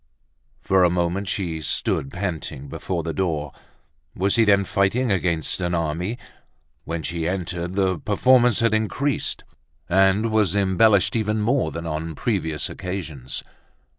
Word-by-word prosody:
For 95 -1 +4
a 90 - +5
moment 90 +3 -1
she 85 -5 -2
stood 70 -2 -1
panting 85 -7 -4
before 85 +2 -3
the 80 0 -3
door. 80 -6 -1 0.6
Was 95 +2 +2
he 115 -1 +4
then 100 -1 +4
fighting 105 +5 +1
against 85 -2 0
an 90 0 0
army? 85 +7 -2 0.7
When 80 0 -4
she 85 0 -2
entered, 90 -1 -3
the 95 -3 +1
performance 120 - +3
had 115 -2 +3
increased 115 +5 -1 0.4
and 95 +4 +3
was 105 -4 +2
embellished 100 +2 +3
even 110 -1 0
more 125 +6 +1
than 85 0 -6
on 80 0 -4
previous 80 -9 -1
occasions. 85 -9 -6
95 Hz, 135 wpm, -23 LUFS, 85-105 Hz, 0.7 s, a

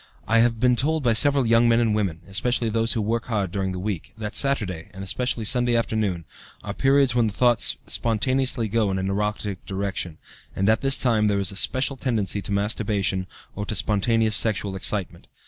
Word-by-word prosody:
I 115 +1 +3
have 115 -1 +2
been 125 +1 +3
told 155 +4 0
by 120 -2 +3
several 140 +3 +3
young 115 +1 +4
men 115 0 +4
and 115 -2 +1
women, 95 -6 -2
especially 115 +4 0
those 115 +1 0
who 110 - -1
work 115 +2 -1
hard 100 -6 -2
during 95 0 -2
the 90 - -5
week, 95 -3 -5
that 105 0 -5
Saturday, 105 - -1
and 95 - -7
especially 115 +3 -2
Sunday 120 +1 +2
afternoon, 105 -7 -1 0.4
are 100 - -5
periods 135 +1 +2
when 120 -2 +2
the 105 - -4
thoughts 120 +2 +3
spontaneously 125 +1 0
go 110 -1 0
in 95 - -2
an 95 +1 -2
erotic 105 -1 -3
direction, 95 -4 -4 0.4
and 95 - 0
at 110 0 +2
this 135 0 +4
time 110 -4 +2
there 100 -1 +1
is 100 -2 0
a - - -9
special 130 +6 +2
tendency 110 -6 -1
to 100 - -7
masturbation 100 -2 -1 0.3
or 105 - -4
to 105 - -4
spontaneous 110 +2 +1
sexual 105 -3 0
excitement. 95 -3 -3
110 Hz, 200 wpm, -23 LUFS, 100-120 Hz, 0.4 s, young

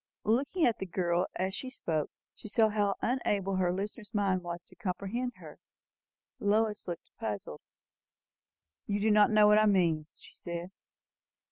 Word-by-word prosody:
Looking 275 - +2
at 235 - +2
the 190 - -4
girl, 175 0 0
as 190 +1 -1
she 260 - -5
spoke, 160 - -2 0.2
she - - -11
saw 220 0 +3
how 205 -2 +1
unable 200 -6 0
her 180 -1 +2
listener's 210 +3 -5
mind 195 -3 +2
was 175 0 -6
to - - -19
comprehend 215 +5 -3
her. - - -12 0.8
Lois 210 +1 +1
looked 175 -2 -6
puzzled. 100 -8 -4 1.3
"You 205 0 0
do 215 +1 +3
not 210 0 +6
know 215 -1 +6
what 210 0 +6
I 215 - +4
mean?" 170 -6 +2
she - - -17
said. 170 +1 -6
200 Hz, 155 wpm, -31 LUFS, 180-215 Hz, 1.3 s, not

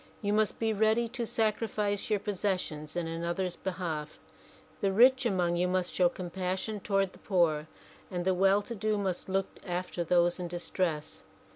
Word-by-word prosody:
You 205 0 +1
must 215 -1 +2
be 225 -1 +1
ready 220 +3 +3
to 240 -1 -3
sacrifice 215 -2 0
your 210 - +3
possessions 185 -7 -2
in 175 -1 -1
another's 170 +2 -2
behalf. 165 -5 -4 0.6
The 195 - +1
rich 250 +5 +6
among 175 -4 +1
you 180 +1 +2
must 180 0 0
show 180 -1 +4
compassion 185 +4 -3
toward 195 -1 0
the - - -16
poor, 165 -5 +1 0.4
and 175 -1 -3
the 190 - +3
well 195 +2 +4
to 235 - -5
do 215 -1 0
must 190 -2 -2
look 195 0 +1 0.2
after 180 -1 -3
those 175 +1 +3
in 180 - -3
distress. 170 -3 -2
185 Hz, 165 wpm, -30 LUFS, 175-210 Hz, 0.6 s, rich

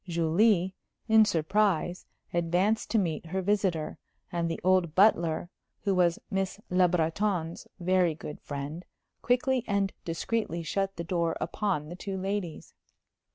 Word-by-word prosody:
Julie, 175 +3 +2 0.3
in 220 -1 +6
surprise, 180 -1 +1 0.3
advanced 175 +6 +1
to 230 - +2
meet 170 -4 -1
her 190 +3 -2
visitor, 185 -6 0 0.3
and 170 -1 -1
the 165 - -3
old 185 -3 +3
butler, 175 -4 +3 0.3
who 200 -1 +1
was 175 -2 +3
Miss 195 +1 -1
Le 180 0 +5
Breton's 170 0 -1
very 180 -2 +2
good 150 -1 -8
friend, 145 +4 -5 0.4
quickly 250 0 +2
and 200 -1 0
discreetly 170 0 -2
shut 195 +3 -1
the 170 - -4
door 170 -1 0
upon 185 -8 -2
the 175 - -6
two 195 +1 -5
ladies. 190 -3 -4
180 Hz, 135 wpm, -29 LUFS, 165-200 Hz, 0.4 s, in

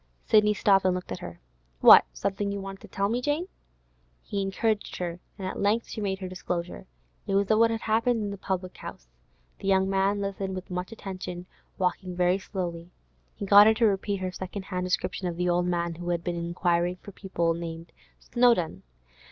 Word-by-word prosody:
Sidney 210 -1 +4
stopped 195 -1 +4
and 185 -1 +2
looked 180 - -6
at - - -4
her. 85 0 -9 0.4
'What? - - +10
Something 200 +1 -2
you 200 - -3
wanted 195 0 -7
to - - -11
tell 200 0 -1
me, 235 +4 -1
Jane?' 295 +6 0 0.8
He 200 - -3
encouraged 205 +2 -1
her, 175 -1 -4 0.2
and 190 -2 -4
at - - -5
length 210 +3 +1
she 220 - -5
made 195 -2 -1
her 190 -1 -6
disclosure. 175 - -5 0.4
It 195 - 0
was 200 +1 +2
of 215 - +4
what 230 0 +6
had 225 0 -2
happened 230 +2 +1
in 205 - -3
the 200 - -6
public 185 -1 -3
house. 60 - -9 0.5
The - - -5
young 190 -1 +3
man 195 +1 +1
listened 195 -1 -3
with 185 0 -7
much 180 +2 -4
attention, 185 -4 -6 0.3
walking 180 0 -1
very 180 +1 +2
slowly. 175 -3 -5 0.5
He - - -5
got 205 +1 +8
her 220 - +5
to 230 - +3
repeat 200 -1 0
her 185 0 -2
second 190 +2 -6
hand 180 -1 -3
description 180 0 -1
of 175 - -3
the 180 0 0
old 175 0 +2
man 170 -1 -1
who 175 +1 -6
had 170 -1 -1
been 175 - -2
inquiring 170 +1 0
for 200 - -12
people 170 -4 -1
named 165 0 -7 0.3
Snowdon. 240 -9 +2
190 Hz, 200 wpm, -27 LUFS, 180-200 Hz, 0.8 s, What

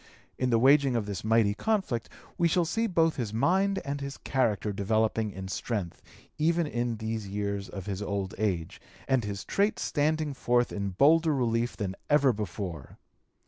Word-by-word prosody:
In 130 - +1
the 115 - +4
waging 135 +1 +5
of 115 -3 0
this 100 -1 -5
mighty 110 -1 +3
conflict 190 - -1 0.3
we 170 - +3
shall 170 +1 +2
see 225 +7 0
both 165 -4 +2
his 115 -6 -2
mind 190 - +2
and 140 0 -3
his 140 0 -5
character 110 -6 0
developing 110 +2 +1
in 95 -1 -7
strength 100 -2 -3 0.4
even 170 +2 +2
in 120 -5 -2
these 110 -1 -4
years 100 0 -3
of 95 -2 -7
his 100 -1 -4
old 100 -2 -3
age, 90 -7 -2 0.3
and 130 -3 +2
his 100 -1 -5
traits 205 +2 0
standing 155 0 0
forth 120 -2 +1
in 100 -1 -2
bolder 155 - +4
relief 120 -2 0
than 95 -3 -3
ever 145 -3 +4
before. 95 - -6
115 Hz, 170 wpm, -28 LUFS, 100-145 Hz, 0.4 s, waging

